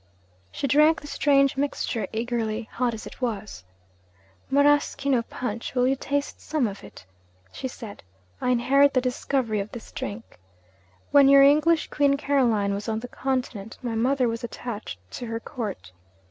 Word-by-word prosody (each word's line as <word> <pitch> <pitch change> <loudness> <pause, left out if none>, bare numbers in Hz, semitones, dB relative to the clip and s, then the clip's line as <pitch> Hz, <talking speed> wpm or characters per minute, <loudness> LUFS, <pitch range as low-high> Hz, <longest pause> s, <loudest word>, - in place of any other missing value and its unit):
She - - -3
drank 300 +4 +4
the - - -13
strange 280 -1 +3
mixture 275 -4 -2
eagerly, 225 -1 -2
hot 240 -2 -1
as 215 - -9
it - - -11
was. 210 - -4 0.9
'Maraschino 285 -2 +3
punch 230 0 -5
will 250 0 +3
you 270 - +2
taste 280 +1 -3
some 305 -5 0
of 200 -2 -5
it?' 105 -3 -13 0.5
she 260 - -5
said. 225 -5 -9 0.4
'I - - 0
inherit 275 +3 +4
the - - +5
discovery 250 -3 -1
of 200 +1 -5
this 235 - -9
drink. 230 - -7 0.7
When 280 -1 +7
your 275 0 +8
English 305 +3 +4
Queen 280 -1 +3
Caroline 240 -9 +1
was 205 +3 -4
on 220 0 -2
the 245 - -6
Continent, 250 -5 -3
my 240 -2 -2
mother 250 +3 +2
was 230 0 -3
attached 230 - -6
to 245 - -6
her 225 0 -3
Court. 215 - -6
250 Hz, 160 wpm, -25 LUFS, 225-280 Hz, 0.9 s, your